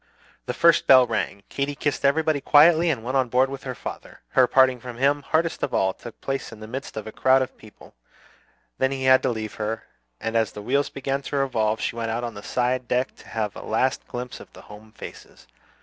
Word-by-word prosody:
The - - -3
first 170 0 +4
bell 130 -2 +8
rang. 110 -3 -3
Katy 140 +1 -2
kissed 145 0 -2
everybody 155 +1 +2
quietly 165 +4 +6
and 130 -8 -1
went 130 +3 -3
on 130 -2 +2
board 130 +2 +2
with 135 0 -7
her 130 -1 -4
father. - - -9
Her 130 -1 +4
parting 130 -1 +4
from 120 0 -9
him, 140 +3 +2
hardest 160 +3 0
of - - -1
all, 95 0 +2
took 120 +2 -12
place 135 -2 -3
in 115 - -11
the 110 - -8
midst 130 +3 -7
of 110 - -4
a 110 - -7
crowd 130 +3 +3
of 130 - -8
people; 110 -1 -16 0.9
then 130 0 +2
he 135 -1 -3
had 130 0 +6
to 130 - 0
leave 110 -3 -4
her, 110 +1 -3 0.4
and 115 +1 -3
as 110 -2 +1
the 105 - -7
wheels 140 +5 +1
began 135 +1 -3
to 145 - -6
revolve 110 -6 0
she - - -2
went 115 -1 -3
out 115 +2 -2
on 120 -1 -4
the 105 - -9
side 125 +2 -1
deck 125 +1 0
to - - -16
have 105 0 -3
a - - -8
last 130 +1 -1
glimpse 125 0 -6
of - - -14
the - - -13
home 105 +1 -14
faces. - - -12
130 Hz, 230 wpm, -24 LUFS, 115-135 Hz, 0.9 s, bell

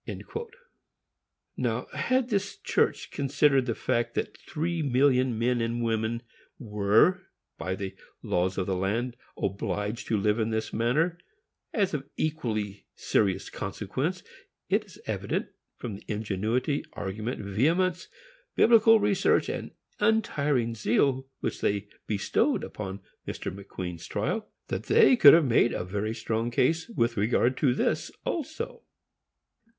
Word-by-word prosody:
Now, - - -1
had 255 -1 +1
this 205 -2 -1
church - - 0
considered 140 -1 +2
the 115 - 0
fact 120 0 -1
that - - -2
three 165 +1 -3
million 130 -3 +3
men 120 +1 +1
and 115 +1 -1
women 115 +1 -1 0.3
were, 110 - +2 0.3
by 95 0 -2
the 95 0 -5 0.3
laws 90 +1 0
of 95 - 0
the 95 - -1
land, 115 +7 -1 0.2
obliged 105 +3 -2
to 110 - +1
live 105 +2 +1
in 110 0 +1
this 110 0 -2
manner, 155 +10 +1 0.5
as 200 -6 +1
of 140 -2 -4
equally 110 -10 -2
serious 95 -3 0
consequence, - - -3 0.5
it - - +2
is - - -16
evident, - - -2 0.3
from 110 -5 -5
the - - -15
ingenuity, 110 +6 -1
argument, 105 +5 -4
vehemence, 165 - +1 0.5
Biblical 225 -1 +6
research, 205 -1 +2
and - - -4 0.3
untiring 145 - +2
zeal, 130 +5 +1
which - - -3
they 100 0 0 0.2
bestowed 100 -2 +1 0.2
on 95 -1 -4 0.3
Mr. - - -4
McQueen's 90 -4 -7
trial, 160 - -2 0.2
that - - -3
they 455 - +6
could 150 -12 +9
have 165 -2 +4
made 120 -1 +3
a - - -2
very 105 +4 -2
strong 115 0 -1
case 160 - +1
with 115 - 0
regard 120 +4 +2
to 130 -4 +2
this - - 0 0.2
also. 345 - -4
120 Hz, 130 wpm, -28 LUFS, 105-155 Hz, 0.5 s, could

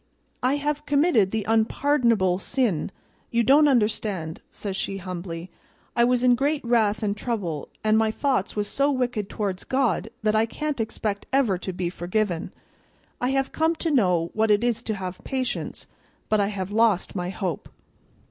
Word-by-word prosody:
I 255 +3 +2
have 295 +1 -2
committed 285 - +3
the 220 0 -2
unpardonable 225 -4 +2
sin; 225 - 0 0.4
you 235 0 +2
don't 290 +6 +6
understand,' 210 - 0
says 200 -2 -5
she 195 0 -3
humbly. 175 -1 -6 0.4
'I 235 0 +5
was 250 0 +2
in 250 -1 +6
great 280 +3 0
wrath 220 -3 +2
and 205 -1 0
trouble, 200 - -3
and 215 0 +4
my 220 0 +2
thoughts 255 -3 0
was 210 -1 -1
so 275 +8 +1
wicked 245 -7 -1
towards 195 -4 -3
God 255 -5 0
that 215 0 +2
I 220 +1 +3
can't 300 +3 -3
expect 215 -2 -3
ever 245 -9 +2
to 190 - -4
be 175 -1 -3
forgiven. 180 -1 -2 0.7
I 250 - +1
have 270 0 0
come 320 +1 +1
to 325 0 -2
know 180 - +2
what 220 0 +1
it 210 +2 +4
is 240 -2 +1
to 220 - -1
have 185 -2 -6
patience, 260 -2 -3 0.4
but 215 - +3
I 200 - +2
have 200 -2 -4
lost 215 -3 +2
my 180 -1 -2
hope. 185 -5 -4
220 Hz, 170 wpm, -25 LUFS, 190-255 Hz, 0.7 s, don't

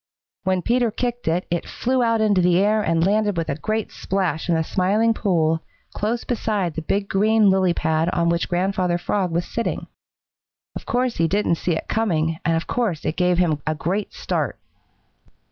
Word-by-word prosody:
When 185 -1 +1
Peter 240 0 +2
kicked 240 +1 -3
it 170 +3 +1
it 175 - 0
flew 255 +1 0
out 230 -2 +2
into 205 -4 +3
the 175 0 +3
air 210 +3 +3
and 165 -3 +1
landed 205 -1 +1
with 165 - -2
a 140 - 0
great 215 +3 -2
splash 185 -4 -2
in 170 - +3
the 160 - +1
Smiling 205 +7 +2
Pool, 165 -7 +1 0.3
close 225 +3 -2
beside 210 -7 -1
the 160 - -4
big 200 +5 -1
green 210 +1 +3
lily 185 -2 +2
pad 160 +1 +1
on 170 -1 0
which 170 0 0
Grandfather 180 -1 0
Frog 185 +1 -1
was 170 +1 -1
sitting. 230 - -3 0.9
Of - - -8
course 250 0 0
he 165 - +2
didn't 195 -1 +1
see 175 - 0
it 160 - -4
coming, 165 -7 0
and 165 -1 +2
of 165 - -3
course 215 -11 -2
it 155 - -1
gave 180 -1 +2
him 160 -5 +1
a 155 - +1
great 185 +7 -2
start. - - -2
185 Hz, 190 wpm, -22 LUFS, 165-215 Hz, 0.9 s, into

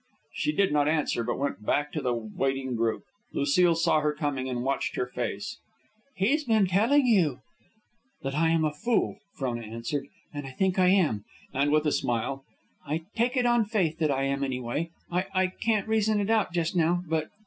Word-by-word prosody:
She 300 - 0
did 200 - +2
not 145 -1 +3
answer, 150 -6 +1
but 120 +1 -2
went 105 -8 -3
back 145 +6 0
to 155 - -3
the 125 -3 0
waiting 130 +3 -2
group. 115 -1 0 0.3
Lucile 165 +5 +3
saw 160 -1 +3
her 150 0 +1
coming 145 -4 -2
and 120 -1 -2
watched 135 +1 -1
her - - 0
face. 120 -5 -4 0.6
"He's 245 +11 +2
been 220 -6 +3
telling 225 +10 +3
you 180 - +3 0.4
?" 265 +5 -44
"That 135 0 -2
I 160 +3 +2
am 165 -1 +2
a 150 - 0
fool," 220 +4 0 0.2
Frona 120 -3 -2
answered. 115 +6 -4 0.3
"And 145 -2 -5
I 130 - -9
think 190 +4 +1
I 180 - +5
am." 170 - +3 0.3
And 140 +2 +2
with 155 +1 +3
a 150 - +2
smile, 135 +3 -1 0.4
"I 155 +3 -3
take 245 +3 +1
it 250 - +2
on 240 -1 +4
faith 190 -7 0
that 155 -2 +2
I 135 -1 +1
am, 140 0 0
anyway. 130 +4 -2 0.2
I 180 +2 0
I 185 0 +4
can't 215 +2 -1
reason 220 -1 +2
it 205 +2 0
out 220 -5 +2
just 170 0 -1
now, 175 +1 +2
but. 155 -1 -1
155 Hz, 200 wpm, -27 LUFS, 135-195 Hz, 0.6 s, I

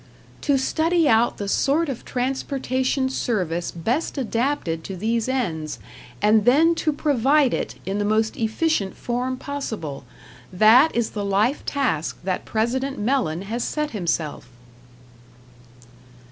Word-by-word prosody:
"To 285 -2 +2
study 320 +4 +1
out 225 -1 +3
the 200 - -4
sort 290 +10 +2
of 265 -5 -5
transportation 260 0 -1
service 180 -10 -1
best 240 - -2
adapted 230 - -1
to 190 - -6
these 225 +4 -1
ends, 165 - -2 0.5
and 210 0 +5
then 300 +8 +5
to 310 - +2
provide 285 -1 +2
it - - -3
in 195 +2 -2
the - - +1
most 215 +1 +1
efficient 220 -2 0
form 250 +2 -2
possible, 220 - -5 0.5
that 220 - +6
is 235 -2 0
the 205 - -4
life 205 +7 +1
task 210 - -1
that 185 0 -2
President 260 +5 -1
Mellen 210 - 0
has 230 +4 -3
set 300 -1 -2
himself." 165 - -2
235 Hz, 130 wpm, -23 LUFS, 200-275 Hz, 0.5 s, that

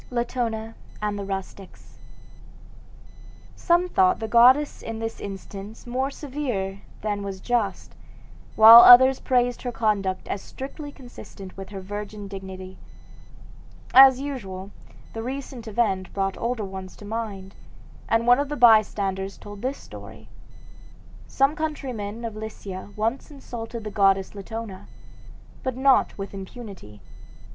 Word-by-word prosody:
LATONA 235 -2 -3 0.3
AND 210 -1 -2
THE 200 - -5
RUSTICS 195 0 -8 1.6
Some 350 +1 +2
thought 370 0 +3
the 220 - -4
goddess 255 +6 +5
in 225 0 -6
this 225 0 -5
instance 200 +2 -8
more 255 +3 -1
severe 255 -10 -4 0.2
than 205 -1 -2
was 195 -1 -6
just, 220 -4 -2 0.6
while 225 +2 +11
others 260 +2 +8
praised 245 -1 +1
her 245 - -3
conduct 205 -5 -1
as 200 - -3
strictly 285 +2 -8
consistent 240 -7 -12
with 195 0 -9
her 195 -2 -7
virgin 205 +1 -7
dignity. 190 -1 -9 1.1
As, 265 0 +8
usual, 200 -9 -6 0.4
the 225 - -5
recent 255 -1 -6
event 200 -4 -1
brought 195 -1 -1
older 235 -3 -3
ones 190 -1 -8
to 205 - -13
mind, 205 -3 -5 0.6
and 230 +1 +2
one 245 +2 +5
of 285 0 -2
the 295 - -4
bystanders 200 -4 +3
told 205 -1 -11
this 260 +3 -2
story: - - -12 1.0
"Some 275 +3 +2
countrymen 240 -8 -4
of 225 -2 -5
Lycia 205 -3 -7
once 225 +7 -2
insulted 235 -5 -8
the 210 - -6
goddess 195 -1 +2
Latona, 205 -1 -7 0.7
but 260 -2 -3
not 270 0 +3
with 195 0 -6
impunity. 195 - -10
220 Hz, 130 wpm, -24 LUFS, 195-250 Hz, 1.6 s, while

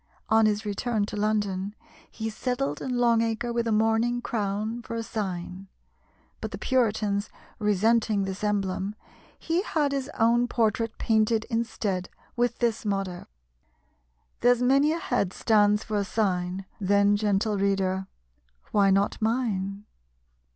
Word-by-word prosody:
On 220 0 +5
his 210 +1 0
return 210 +1 -1
to 210 - -7
London, 205 -2 -1 0.3
he 220 -1 -4
settled 215 - -2
in 250 -2 -2
Long 235 -2 +4
Acre 230 +1 -1
with 235 0 0
a - - +1
mourning 225 +3 +2
crown 215 0 -2
for 230 - -6
a 230 - -2
sign; 190 -3 -5 0.7
but - - -3
the - - -6
Puritans 215 -5 0 0.3
resenting 210 0 +2
this 195 +1 -5
emblem, 200 -1 -1 0.4
he 335 +2 0
had 300 -7 0
his 275 0 -2
own 235 +2 +3
portrait 225 -1 0
painted 220 0 +2
instead 220 -5 -2 0.3
with 240 -1 0
this 235 -2 0
motto 195 -4 -3 1.1
"There's 245 0 +4
many 275 +4 +4
a 325 - 0
head 220 - -1
stands 210 -1 +3
for 215 -1 -2
a 200 - +1
sign: 185 -2 -1
Then, 200 +1 +3
gentle 205 0 +1
reader, 190 -1 0 0.6
why 200 -2 +4
not 195 +3 +1
mine?" 210 -4 -1
215 Hz, 135 wpm, -26 LUFS, 200-235 Hz, 1.1 s, On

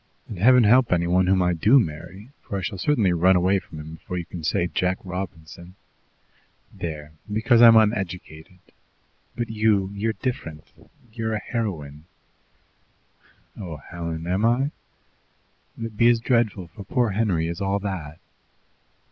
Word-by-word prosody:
And 105 - -8
Heaven 125 +4 +6
help 125 +3 +4
any 85 -1 +2
one 90 +1 +2
whom 95 -1 +3
I 90 0 +2
do 110 +11 +5
marry, 90 +3 -5
for 100 - -5
I 95 - -4
shall 95 +1 -4
certainly 110 -10 +2
run 90 +2 +4
away 95 +2 +2
from 80 - -12
him 80 +1 -9
before 90 +3 -7
you 85 - -4
can 85 -1 -9
say 85 - +1
'Jack 90 +1 -1
Robinson.' 90 -1 -8 1.0
There! 75 -3 -6 0.2
Because 115 +3 +3
I'm 115 -1 +9
uneducated. 95 -5 -1 0.8
But 120 -2 -3
you, 105 -3 +1
you're 110 +3 -1
different; 80 - -5 0.5
you're 110 -1 -2
a - - -2
heroine." 80 - -5 1.5
"Oh, 85 -6 -7
Helen! 85 +1 -6
Am 95 +4 -1
I? 125 +5 +2 1.1
Will 115 - -5
it 110 -2 -8
be 120 +2 +5
as 120 -1 +3
dreadful 115 -6 0
for 100 - -11
poor 115 +3 0
Henry 95 -6 0
as 85 +2 -5
all 100 0 0
that?" 90 -7 -5
95 Hz, 155 wpm, -23 LUFS, 85-110 Hz, 1.5 s, I'm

